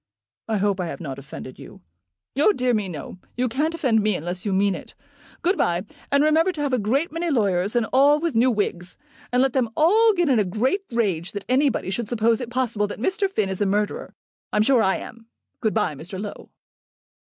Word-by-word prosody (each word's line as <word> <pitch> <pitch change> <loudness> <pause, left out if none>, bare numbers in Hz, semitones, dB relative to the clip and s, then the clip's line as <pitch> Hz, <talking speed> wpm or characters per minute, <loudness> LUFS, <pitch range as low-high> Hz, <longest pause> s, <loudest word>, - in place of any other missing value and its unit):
"I 220 -1 0
hope 200 -1 0
I 180 - -2
have - - -6
not 140 -6 -6
offended 135 -1 -10
you." - - -12 0.5
"Oh 300 +10 +4
dear, 250 -4 +1
no. 185 -4 -4 0.2
You 250 +1 +1
can't 300 +7 -1
offend 245 -9 +2
me 210 -1 +1
unless 175 +4 -4
you - - 0
mean 195 +1 +2
it. - - -9 0.5
Good 365 +3 +1
bye, 175 +3 +1 0.3
and 280 +1 +4
remember 320 +4 +3
to 305 - -5
have 285 -2 -1
a 250 - +2
great 265 +11 0
many 335 +2 -2
lawyers, 200 - +1
and 240 -2 +2
all 285 +3 +5
with 335 -1 -1
new 240 +3 +4
wigs; 185 -6 -2 0.3
and 250 +1 +3
let 270 -2 +1
them 255 -4 +1
all 435 +9 +5
get 350 -4 +1
in 255 -5 +3
a - - +3
great 230 - 0
rage 195 -7 -1
that 205 -1 -6
anybody 255 -6 +1
should 225 +1 -3
suppose 230 0 +1
it 240 - -5
possible 235 -4 -1
that 205 - -7
Mr. 385 - 0
Finn 215 - 0
is 190 +1 -4
a 205 - +2
murderer. 205 +1 -2 0.4
I'm 210 - +3
sure 255 0 +4
I 190 -2 +2
am. 225 0 -9 0.3
Good 220 -3 -1
bye, 210 -8 +1
Mr. 175 +7 -8
Low." 205 0 -7
225 Hz, 215 wpm, -23 LUFS, 195-275 Hz, 0.5 s, all